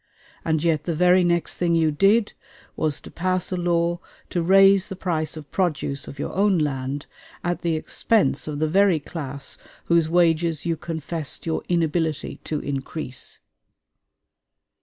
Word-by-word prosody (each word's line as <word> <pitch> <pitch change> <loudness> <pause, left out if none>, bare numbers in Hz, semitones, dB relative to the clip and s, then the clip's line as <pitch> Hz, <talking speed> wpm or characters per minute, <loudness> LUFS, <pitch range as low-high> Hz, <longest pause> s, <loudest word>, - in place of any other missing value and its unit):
And 160 -1 0
yet 155 -3 +1
the 170 - -1
very 180 +2 +5
next 170 -1 0
thing 170 -1 +2
you 160 -2 +3
did 200 +8 +3 0.4
was 155 -2 -1
to - - -12
pass 185 +1 -1
a - - 0
law 175 -1 +1 0.3
to 175 - 0
raise 195 +2 +5
the 195 - -6
price 160 -4 -2
of 150 -2 -10
produce 155 -6 -1
of 140 - -9
your - - -4
own 195 -1 +3
land, 140 -2 -2 0.4
at 175 0 -1
the 170 -2 0
expense 175 +1 +1
of 150 -1 -3
the 155 +1 +1
very 190 0 +4
class 140 -3 -4 0.3
whose 170 -2 +3
wages 165 -2 +2
you 165 -1 +1
confessed 160 -1 -3
your 160 -1 -1
inability 165 -2 0
to 155 - -2
increase. 135 -1 -5
165 Hz, 155 wpm, -23 LUFS, 155-180 Hz, 0.4 s, very